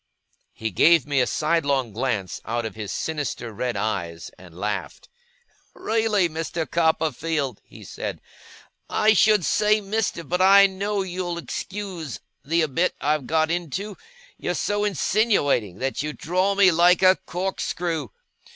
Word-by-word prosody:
He 110 Hz, 0 st, -4 dB
gave 165 Hz, -, +5 dB
me 145 Hz, -2 st, +1 dB
a 125 Hz, -, +1 dB
sidelong 140 Hz, -7 st, 0 dB
glance 110 Hz, -5 st, -2 dB
out 120 Hz, +1 st, -2 dB
of 110 Hz, -, -5 dB
his 105 Hz, -2 st, -6 dB
sinister 140 Hz, -7 st, -4 dB
red 120 Hz, +1 st, -2 dB
eyes, 85 Hz, -6 st, -3 dB
and 90 Hz, -2 st, -15 dB
laughed. 105 Hz, 0 st, -4 dB, 0.7 s
'Really, 220 Hz, -4 st, +1 dB
Master 165 Hz, 0 st, -3 dB
Copperfield,' 160 Hz, -5 st, 0 dB
he -, -, -14 dB
said, -, -, -6 dB, 0.4 s
' -, -, -33 dB, 0.2 s
I 215 Hz, -, +7 dB
should 210 Hz, -3 st, +4 dB
say 215 Hz, 0 st, +3 dB
Mister, 205 Hz, -4 st, -2 dB
but 180 Hz, +2 st, -1 dB
I 195 Hz, +1 st, +8 dB
know 200 Hz, +1 st, -1 dB
you'll 180 Hz, -1 st, -4 dB
excuse 175 Hz, -, -6 dB, 0.2 s
the 165 Hz, +4 st, +1 dB
abit 155 Hz, +4 st, 0 dB
I've 150 Hz, -2 st, 0 dB
got 160 Hz, 0 st, +1 dB
into 175 Hz, +4 st, -3 dB, 0.4 s
you're -, -, -2 dB
so 205 Hz, 0 st, 0 dB
insinuating, 190 Hz, -, +1 dB
that 135 Hz, +2 st, -2 dB
you 150 Hz, +1 st, -3 dB
draw 185 Hz, +6 st, 0 dB
me 195 Hz, -2 st, +6 dB
like 175 Hz, +3 st, +4 dB
a 185 Hz, 0 st, +6 dB
corkscrew! 175 Hz, -4 st, -2 dB
165 Hz, 140 wpm, -24 LUFS, 130-190 Hz, 0.7 s, I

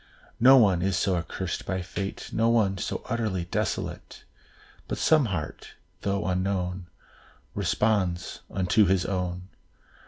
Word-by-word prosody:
No 130 Hz, +3 st, +8 dB
one 100 Hz, -8 st, +4 dB
is 95 Hz, 0 st, +1 dB
so 95 Hz, -1 st, +1 dB
accursed 90 Hz, +1 st, -4 dB
by 95 Hz, -2 st, -2 dB
fate, 95 Hz, +2 st, -5 dB
No 115 Hz, +1 st, +2 dB
one 100 Hz, -5 st, +2 dB
so -, -, -3 dB
utterly 110 Hz, -7 st, -1 dB
desolate, 85 Hz, -, -3 dB, 0.6 s
But -, -, -3 dB
some 155 Hz, -4 st, +4 dB
heart, 85 Hz, -8 st, -5 dB, 0.3 s
though 100 Hz, 0 st, -1 dB
unknown, 90 Hz, -1 st, -1 dB, 0.7 s
Responds 95 Hz, -6 st, 0 dB
unto 95 Hz, +3 st, +3 dB
his 95 Hz, 0 st, +2 dB
own. 90 Hz, -1 st, -3 dB
95 Hz, 125 wpm, -27 LUFS, 90-105 Hz, 0.7 s, No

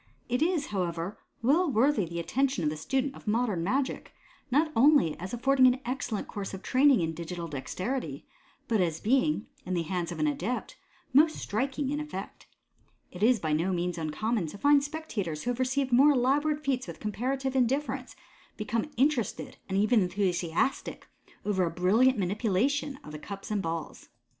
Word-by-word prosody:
It 250 Hz, +3 st, -1 dB
is, 325 Hz, -3 st, +2 dB
however, 175 Hz, 0 st, -2 dB, 0.2 s
well 315 Hz, +8 st, +3 dB
worthy 240 Hz, -3 st, +3 dB
the 170 Hz, +1 st, -5 dB
attention 265 Hz, +3 st, 0 dB
of 150 Hz, -, +1 dB
the -, -, -4 dB
student 265 Hz, -, -1 dB
of -, -, -14 dB
modem 210 Hz, -5 st, +1 dB
magic, 260 Hz, +8 st, -2 dB, 0.3 s
not 300 Hz, +5 st, +2 dB
only 265 Hz, -, +5 dB
as 185 Hz, +2 st, -6 dB
affording 260 Hz, +2 st, +4 dB
an 250 Hz, +1 st, +2 dB
excellent 245 Hz, -4 st, -3 dB
course 195 Hz, -1 st, -5 dB
of 190 Hz, -, -10 dB
training 265 Hz, -3 st, +4 dB
in 165 Hz, -1 st, -1 dB
digital 170 Hz, +1 st, -5 dB
dexterity, 185 Hz, -, -4 dB, 0.4 s
but 220 Hz, -4 st, +2 dB
as 165 Hz, -3 st, 0 dB
being, 265 Hz, +1 st, +1 dB, 0.2 s
in 185 Hz, -, -3 dB
the 170 Hz, -, 0 dB
hands 175 Hz, 0 st, -3 dB
of -, -, -5 dB
an 310 Hz, -, +1 dB
adept, 280 Hz, -4 st, -2 dB, 0.4 s
most 310 Hz, +4 st, +5 dB
striking 265 Hz, +5 st, -2 dB
in 295 Hz, -, -1 dB
effect. 300 Hz, -11 st, -7 dB, 0.6 s
It 180 Hz, -, -10 dB
is 235 Hz, +1 st, +4 dB
by 155 Hz, -3 st, -1 dB
no 165 Hz, +5 st, +1 dB
means 175 Hz, -1 st, -2 dB
uncommon 175 Hz, +5 st, -1 dB
to 180 Hz, -, -8 dB
find 285 Hz, +4 st, +4 dB
spectators 235 Hz, -, -4 dB
who 245 Hz, -, 0 dB
have 245 Hz, -, -5 dB
received 260 Hz, +1 st, 0 dB
more 275 Hz, +5 st, +6 dB
elaborate 290 Hz, +4 st, +1 dB
feats 265 Hz, -2 st, 0 dB
with -, -, -8 dB
comparative 260 Hz, +5 st, -2 dB
indifference, 265 Hz, +3 st, 0 dB, 0.4 s
become 225 Hz, +5 st, -2 dB
interested, 260 Hz, -5 st, 0 dB
and 190 Hz, -, 0 dB
even 215 Hz, +2 st, +4 dB
enthusiastic, 180 Hz, -, -1 dB, 0.4 s
over 195 Hz, -3 st, +1 dB
a 170 Hz, -, +1 dB
brilliant 205 Hz, +10 st, +3 dB
manipulation 225 Hz, +9 st, 0 dB
of 150 Hz, -, -10 dB
the 150 Hz, -, -7 dB
cups 200 Hz, +5 st, -8 dB
and 210 Hz, -2 st, 0 dB
balls. 165 Hz, -2 st, -5 dB
230 Hz, 170 wpm, -29 LUFS, 180-270 Hz, 0.6 s, more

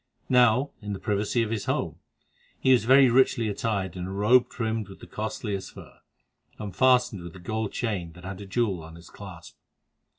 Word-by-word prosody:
Now, 125 Hz, +2 st, +4 dB
in 105 Hz, -1 st, -4 dB
the 95 Hz, -, -5 dB
privacy 105 Hz, +2 st, 0 dB
of 110 Hz, -, -4 dB
his 110 Hz, -3 st, -2 dB
home, -, -, -2 dB, 0.6 s
he 130 Hz, -, +3 dB
was 120 Hz, -4 st, +3 dB
very 135 Hz, +2 st, +7 dB
richly 130 Hz, -2 st, +3 dB
attired 100 Hz, -4 st, -2 dB
in 90 Hz, 0 st, -5 dB
a -, -, -6 dB
robe 105 Hz, +6 st, +4 dB
trimmed 110 Hz, -3 st, -3 dB
with 95 Hz, -, -12 dB
the -, -, -11 dB
costliest 105 Hz, -2 st, -5 dB
fur, -, -, -13 dB, 0.6 s
and 100 Hz, -4 st, -7 dB
fastened 125 Hz, -5 st, +3 dB
with 85 Hz, 0 st, -9 dB
a -, -, -10 dB
gold 110 Hz, +4 st, -3 dB
chain 95 Hz, -8 st, -3 dB
that 90 Hz, +1 st, -13 dB
had 95 Hz, +1 st, -6 dB
a 100 Hz, -, -9 dB
jewel 100 Hz, -4 st, 0 dB
on 80 Hz, +1 st, -11 dB
its 85 Hz, -1 st, -15 dB
clasp. 85 Hz, -6 st, -11 dB
105 Hz, 195 wpm, -26 LUFS, 95-120 Hz, 0.6 s, very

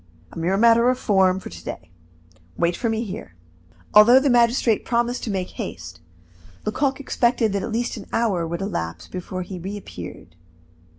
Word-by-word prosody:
A -, -, -11 dB
mere 180 Hz, +4 st, +1 dB
matter 235 Hz, +2 st, +5 dB
of 255 Hz, -, +1 dB
form 190 Hz, -5 st, +3 dB
for -, -, -9 dB
to 85 Hz, 0 st, -10 dB
day. 85 Hz, +2 st, -8 dB, 0.7 s
Wait 170 Hz, +1 st, +1 dB
for 235 Hz, -, -1 dB
me 225 Hz, +1 st, -1 dB
here." 185 Hz, -, -8 dB, 0.6 s
Although 230 Hz, +5 st, +8 dB
the 275 Hz, 0 st, +2 dB
magistrate 235 Hz, -2 st, +3 dB
promised 240 Hz, +1 st, 0 dB
to -, -, -4 dB
make 190 Hz, -3 st, -2 dB
haste, 85 Hz, +1 st, -7 dB, 0.7 s
Lecoq 265 Hz, +5 st, 0 dB
expected 240 Hz, -5 st, +1 dB
that 200 Hz, -, 0 dB
at 230 Hz, -, -4 dB
least 235 Hz, +2 st, -2 dB
an 205 Hz, -, -9 dB
hour 200 Hz, -8 st, 0 dB
would 170 Hz, +3 st, -4 dB
elapse 85 Hz, -, -4 dB
before 185 Hz, 0 st, -5 dB
he 180 Hz, 0 st, -7 dB
reappeared. 165 Hz, -, -8 dB
205 Hz, 170 wpm, -23 LUFS, 180-235 Hz, 0.7 s, Although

